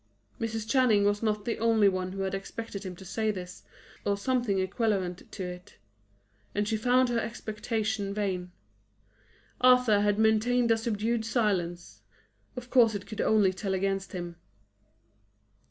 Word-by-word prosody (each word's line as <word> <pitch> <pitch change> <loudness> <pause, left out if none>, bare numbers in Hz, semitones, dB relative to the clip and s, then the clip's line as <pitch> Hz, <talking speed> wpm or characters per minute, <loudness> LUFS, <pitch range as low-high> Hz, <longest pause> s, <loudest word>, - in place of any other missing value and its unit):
Mrs. 225 -1 -3
Channing 240 -5 +4
was 205 0 +1
not 210 -2 -1
the 235 - -2
only 225 -2 +4
one 185 -1 -1
who 195 - -4
had 190 - -2
expected 200 +1 -6
him 185 -2 -6
to 190 - -12
say 220 +4 -1
this, 180 -3 -5 0.4
or 200 0 0
something 240 -2 0
equivalent 190 -2 -1
to 195 - -5
it; 180 0 -8 0.8
and 205 0 0
she 220 - 0
found 250 +3 +3
her 235 -1 +1
expectation 215 -2 -3
vain. 190 -3 -2 1.1
Arthur 250 -5 +5
had 205 0 +2
maintained 225 +2 +3
a 225 - +4
studied 225 +1 -1
silence; 195 -7 -1 0.6
of 250 0 -7
course 230 -4 +5
it 200 - -5
could 215 - -5
only 205 -4 +3
tell 190 +1 -2
against 195 +1 -2
him. 175 -2 -6
210 Hz, 150 wpm, -28 LUFS, 195-225 Hz, 1.1 s, Arthur